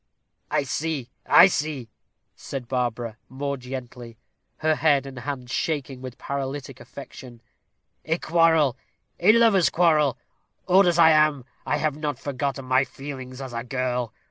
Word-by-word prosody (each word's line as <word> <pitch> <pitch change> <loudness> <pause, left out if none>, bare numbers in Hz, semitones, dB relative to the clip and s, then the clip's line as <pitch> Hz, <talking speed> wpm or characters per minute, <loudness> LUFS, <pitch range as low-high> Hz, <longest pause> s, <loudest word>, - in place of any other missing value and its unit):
"I - - +1
see, 140 -1 -3 0.2
I - - +9
see," 150 -9 -1 0.5
said 130 -3 -7
Barbara, 120 -2 -2
more 140 +2 -3
gently, 125 -2 -8 0.4
her 155 0 +2
head 145 -3 +2
and 135 -2 -8
hand 130 -1 -6
shaking 140 -5 -2
with 130 -2 -8
paralytic 135 -1 -5
affection: 125 -3 -11 0.6
"a 165 +1 0
quarrel, 165 -6 +3 0.4
a 185 +5 +6
lover's 225 -6 +4
quarrel. 155 -6 +3 0.5
Old 190 +1 +5
as 175 -1 +2
I 165 -1 +7
am, 155 -4 +3 0.2
I 145 +3 +1
have 150 -1 -1
not 150 -3 -3
forgotten 140 0 -3
my 130 +1 +3
feelings 135 -2 -8
as 130 -2 -7
a 115 0 -3
girl. 125 -2 -2
140 Hz, 145 wpm, -24 LUFS, 130-155 Hz, 0.6 s, I